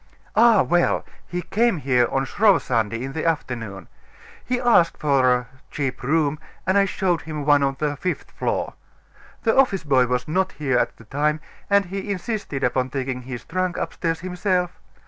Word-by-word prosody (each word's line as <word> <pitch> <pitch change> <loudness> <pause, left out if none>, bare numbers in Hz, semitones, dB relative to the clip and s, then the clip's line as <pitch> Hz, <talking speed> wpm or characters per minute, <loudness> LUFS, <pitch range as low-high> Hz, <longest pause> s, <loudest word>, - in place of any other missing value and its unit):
"Ah, 230 -3 +6
well! 175 0 +1 0.2
he 180 0 -4
came 220 +2 +1
here 125 -4 +2
on 135 0 0
Shrove 200 - +3
Sunday, 115 -1 -1
in 135 +1 -5
the 160 - -3
afternoon. 115 - -3 0.6
He 250 0 -1
asked 235 -9 +4
for 135 -4 +3
a 125 -1 0 0.2
cheap 135 -4 -3
room, 150 +2 +1 0.3
and 190 - +2
I 200 0 +5
showed 185 -3 0
him 150 -2 -5
one 145 -1 +5
on 135 -1 +1
the 150 -1 -1
fifth 180 +5 -3
floor. - - -2 0.7
The 225 - +2
office 225 -10 +3
boy 130 -4 +3
was 125 0 -1
not 190 +4 0
here 135 -5 0
at - - -1
the 115 - -15
time, 150 +6 0 0.3
and 200 0 +4
he 195 +3 -5
insisted 195 - -3
upon 125 +1 +1
taking 130 -1 -3
his 125 -1 -7
trunk 185 0 -2
upstairs 165 -1 -2
himself. 180 0 0
155 Hz, 175 wpm, -23 LUFS, 130-185 Hz, 0.7 s, Ah